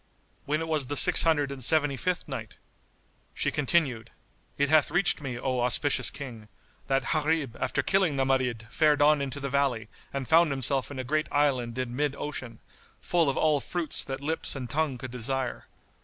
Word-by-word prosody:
When 150 +2 0
it 165 - -3
was 155 -5 -1
the 145 +2 -2
Six - - +6
Hundred 145 -4 +2
and 135 -2 -6
Seventy 145 0 +3
fifth 180 +6 -2
Night, - - -7 0.8
She - - 0
continued, 135 -6 0 0.5
It 140 - +2
hath 155 0 +4
reached 175 0 +1
me, 130 -4 -5
O 130 0 -1
auspicious 125 +1 +2
King, 115 -6 -8 0.4
that 135 0 0
Gharib 155 -5 0
after - - -1
killing 190 -6 +2
the 135 -1 +1
Marid 125 -4 0
fared 150 -1 +3
on 150 0 +4
into 140 0 -4
the 140 - -3
valley 130 -6 0 0.2
and 135 -2 -4
found 165 0 +5
himself 135 -1 0
in 140 - -8
a 130 - -3
great 155 +4 -1
island 130 -5 0
in 125 -1 -3
mid 145 0 0
ocean, 130 -7 -6 0.4
full 170 -4 +1
of 135 - -2
all 155 -2 +3
fruits 170 0 -2
that 135 0 -5
lips 160 +2 -1
and 125 -3 -5
tongue 150 -4 0
could 130 0 -8
desire. 125 +1 -3
140 Hz, 185 wpm, -27 LUFS, 130-155 Hz, 0.8 s, Six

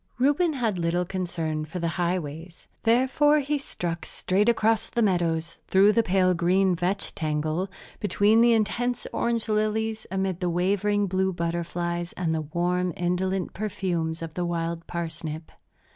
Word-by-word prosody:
Reuben 290 +6 +3
had 225 -9 -1
little 170 +1 0
concern 170 -4 -2
for 160 +4 -7
the 170 -1 -1
highways. 170 -1 -3 0.2
Therefore 260 +6 +4
he 290 0 0
struck 170 -10 -4
straight 200 +5 0
across 225 -1 +2
the 235 - +1
meadows, 170 -4 0
through 195 +2 +5
the 230 - +4
pale 185 -3 +3
green 180 +2 +2
vetch 185 +3 -2
tangle, 155 +4 -1 0.3
between 210 +2 +3
the 235 0 +6
intense 235 +3 0
orange 235 -1 0
lilies, 215 +1 0
amid 190 -2 -1
the 180 - 0
wavering 200 +4 +1
blue 190 0 0
butterflies 170 0 -2
and 165 -3 -1
the 160 - 0
warm, 175 +4 0
indolent 180 +1 -1
perfumes 180 -6 -2
of 160 -1 -6
the 180 - -2
wild 170 -1 -2
parsnip. 160 -2 -5
180 Hz, 145 wpm, -26 LUFS, 170-215 Hz, 0.3 s, the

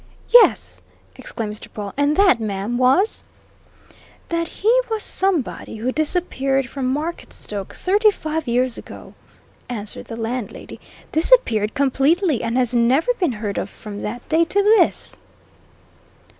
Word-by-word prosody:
"Yes!" 485 -1 +5 0.3
exclaimed 215 -3 -5
Mr. 210 - -9
Pawle. 205 -2 -7
"And 285 +2 +1
that, 385 -11 +5
ma'am, 210 +1 -3
was 270 - +2 0.5
" - - -27
"That 335 0 -1
he 455 +9 +2
was 440 -2 +1
somebody 365 -12 -1
who 230 +4 -2
disappeared 275 -4 0
from 255 0 -3
Marketstoke 280 - -5
thirty 415 +4 +3
five 315 -6 -4
years 245 0 0
ago," - - -12 0.6
answered 215 -4 -5
the 230 - -8
landlady, 230 0 -5 0.3
"disappeared 310 - +3
completely, 280 - +1
and 230 +1 -2
has 250 -1 +1
never 255 - +2
been 345 - +1
heard 210 -2 -4
of 200 - -4
from 205 -1 -9
that 240 +3 -6
day 325 +1 +3
to 400 +4 +1
this!" 430 +2 +2
265 Hz, 135 wpm, -20 LUFS, 230-340 Hz, 0.6 s, Yes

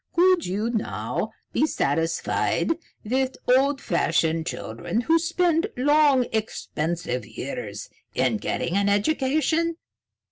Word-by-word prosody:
Could 360 -1 +4
you 210 +6 -1
now 220 -3 -2 0.2
be 310 - +3
satisfied 165 - 0 0.3
with 260 +3 0
old 270 +3 +4
fashioned 165 -3 +1
children 115 - -3
who 325 +7 +3
spend 345 +1 +1
long, 285 -1 +4
expensive 165 - -2
years - - -6 0.3
in - - +2
getting 170 - -2
an 200 0 +2
education? 310 +9 +1
255 Hz, 105 wpm, -25 LUFS, -, 0.3 s, Could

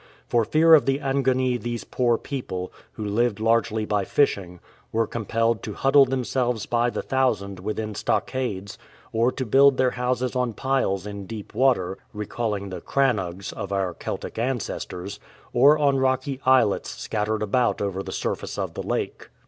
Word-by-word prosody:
For 120 -1 +2
fear 160 +5 +5
of 150 -4 +6
the 135 0 +3
Angoni 130 -3 +1
these 120 -1 -3
poor 120 -2 +1
people, 95 -11 -5 0.2
who 110 - -5
lived 105 +1 +1
largely 110 -1 +1
by 105 -2 0
fishing, 95 -8 0 0.3
were 115 0 +1
compelled 115 0 0
to 105 - -6
huddle 135 +1 +5
themselves 125 -2 -1
by 120 0 +1
the - - -4
thousand 110 -8 0
within 110 +2 -3
stockades, 100 -3 -2 0.3
or 115 +3 +3
to 130 - -3
build 135 +3 +5
their 130 -1 +3
houses 125 0 -1
on 125 -2 0
piles 120 -7 0
in 100 -2 -7
deep 110 -1 -8
water 95 -8 +2 0.2
(recalling 105 -1 -3
the 90 -2 -6
"crannogs' 100 -9 0
of 100 - -6
our 95 -2 0
Celtic 110 - -5
ancestors), 100 -5 -3 0.3
or 140 +5 +6
on 140 -2 +3
rocky 130 +1 0
islets 130 -6 +4
scattered 110 0 -2
about 120 +4 +1
over 100 -1 -2
the - - -7
surface - - -3
of - - -3
the - - -4
lake. - - -3
115 Hz, 160 wpm, -24 LUFS, 100-130 Hz, 0.3 s, of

